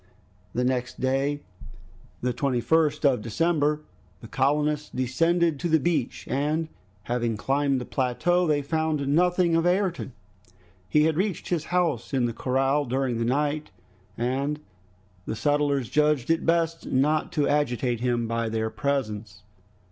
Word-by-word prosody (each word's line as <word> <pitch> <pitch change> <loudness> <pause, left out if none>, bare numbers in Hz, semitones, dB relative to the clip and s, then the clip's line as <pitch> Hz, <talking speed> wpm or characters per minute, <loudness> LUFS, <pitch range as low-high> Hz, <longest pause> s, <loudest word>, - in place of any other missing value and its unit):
The 125 - +1
next 125 0 -1
day 135 +2 0 0.8
the 125 0 0
21st 140 +5 +1
of 130 -5 +3
December 150 +5 +1 0.4
the 115 - -9
colonists 150 +5 0
descended 165 +5 +1
to 175 - -2
the 160 0 +4
beach, 150 -4 -1
and 155 +4 -1 0.3
having 120 -1 -1
climbed 140 +3 +1
the 125 - -5
plateau 170 +8 +1
they 145 -2 +1
found 155 -1 -1
nothing 175 +3 +3
of 165 +1 +2
Ayrton. 180 - 0 0.8
He 150 - +4
had 160 0 +2
reached 195 0 -1
his 165 -3 -1
house 165 -8 0
in 125 -2 +2
the 120 - -2
corral 135 +4 +1
during 130 -2 -1
the 115 - 0
night 145 +4 0 0.5
and 135 +5 -1 0.7
the - - -2
settlers 145 -1 +1
judged 150 -1 +2
it 165 - 0
best 165 0 +1
not 150 +4 +1
to 150 -3 +1
agitate 125 -5 0
him 120 -1 0
by 115 0 -1
their 110 0 -2
presence. 110 -8 -3
145 Hz, 140 wpm, -26 LUFS, 125-160 Hz, 0.8 s, the